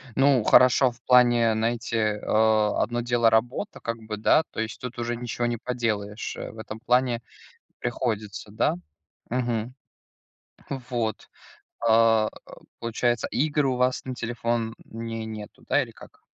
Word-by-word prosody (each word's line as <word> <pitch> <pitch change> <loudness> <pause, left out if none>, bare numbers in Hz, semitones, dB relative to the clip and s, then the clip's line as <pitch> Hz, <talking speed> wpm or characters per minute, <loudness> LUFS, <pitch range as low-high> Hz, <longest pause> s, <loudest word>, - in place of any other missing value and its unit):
Ну, 135 -3 +4
хорошо 125 +3 +6
в 120 +1 -20
плане, 120 -2 +5
знаете, 115 +1 -1
э, 105 -1 0
одно 110 +2 +2
дело- 120 -1 +3
работа 120 - 0
как 115 0 -3
бы, 105 -1 -5
да, 135 +8 +4
то - - -7
есть 110 -1 -3
тут 125 0 -6
уже 120 0 -2
ничего 120 0 -3
не 120 0 -1
поделаешь, 110 -4 -3
э, - - -6
в - - -15
этом 110 0 -7
плане 125 0 +2 0.6
приходится, 110 -4 -3
да. 110 -4 +1 0.5
Мгм, 120 -1 -1 1.0
вот, 120 -4 -3 0.6
э, 115 -1 +5 0.5
получается, 120 0 0
игр 150 +1 +1
у 130 -1 +1
вас 125 +1 +1
на 130 - -4
телефоне 115 -1 -2 0.5
нету, 110 -2 -9
да, - - +3
или - - -11
как? - - -16
115 Hz, 140 wpm, -26 LUFS, 110-125 Hz, 1.0 s, хорошо